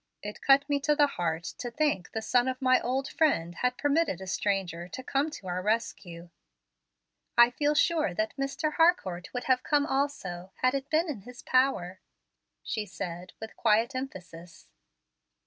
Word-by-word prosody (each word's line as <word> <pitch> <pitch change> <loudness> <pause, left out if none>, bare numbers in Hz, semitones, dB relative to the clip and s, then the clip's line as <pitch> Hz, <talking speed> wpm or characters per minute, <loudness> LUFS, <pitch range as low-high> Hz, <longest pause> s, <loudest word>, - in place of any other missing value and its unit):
It 210 0 -7
cut 280 +1 +5
me 285 -1 +1
to 295 +2 +2
the 295 -1 +5
heart 170 - -2 0.2
to 245 - -4
think 290 -9 -1
the 220 - -3
son 245 +2 +2
of 255 0 -2
my 255 -1 +4
old 265 +3 -1
friend 175 - +1
had 250 +7 -1
permitted 290 - +1
a 190 - -7
stranger 185 -3 -2
to 260 +8 -8
come 275 +4 0
to 295 -10 -10
our 180 0 -2
rescue." 185 -5 -3 1.1
"I 240 0 +7
feel 295 +4 +1
sure 310 - +2
that 215 +3 -1
Mr. 275 +3 -2
Harcourt 325 - +2
would 250 - -4
have 255 -1 +2
come 290 +1 +2
also, 195 - -2
had 255 0 +4
it 275 0 -3
been 320 +3 +2
in 270 -10 -5
his 245 +3 -12
power," 225 -9 +1 0.6
she 215 - -2
said, 175 -1 -6
with 220 0 -8
quiet 225 +3 +2
emphasis. 180 -10 -8
245 Hz, 170 wpm, -29 LUFS, 185-280 Hz, 1.1 s, I